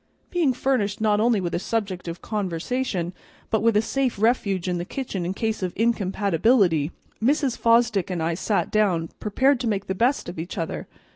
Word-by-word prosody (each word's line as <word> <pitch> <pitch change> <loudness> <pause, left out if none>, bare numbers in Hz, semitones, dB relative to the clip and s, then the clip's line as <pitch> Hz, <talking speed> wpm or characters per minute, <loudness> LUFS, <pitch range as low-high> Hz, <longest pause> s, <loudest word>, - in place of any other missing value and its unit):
Being 340 -7 +2
furnished 245 -6 0
not 210 -1 +2
only 225 -1 +3
with 175 -2 -3
a - - 0
subject 195 -3 -3
of 170 +1 -6
conversation, 190 -1 -2 0.4
but 220 - +2
with 225 -1 +3
a 215 - +3
safe 265 -1 -1
refuge 200 -5 +1
in 180 -1 -1
the - - -2
kitchen 190 -5 -4
in 185 - -3
case 220 0 -2
of 180 -2 -2
incompatibility, 200 - +2 0.3
Mrs. 275 0 +2
Fosdick 230 -5 +3
and 180 - -2
I 165 +1 0
sat 195 +4 -1
down, 180 -7 +2
prepared 260 +6 +2
to 245 - -2
make 200 -2 -1
the 190 - -2
best 245 +8 +1
of 175 -1 -6
each 175 +5 -6
other. 165 -2 -3
210 Hz, 190 wpm, -24 LUFS, 180-235 Hz, 0.4 s, only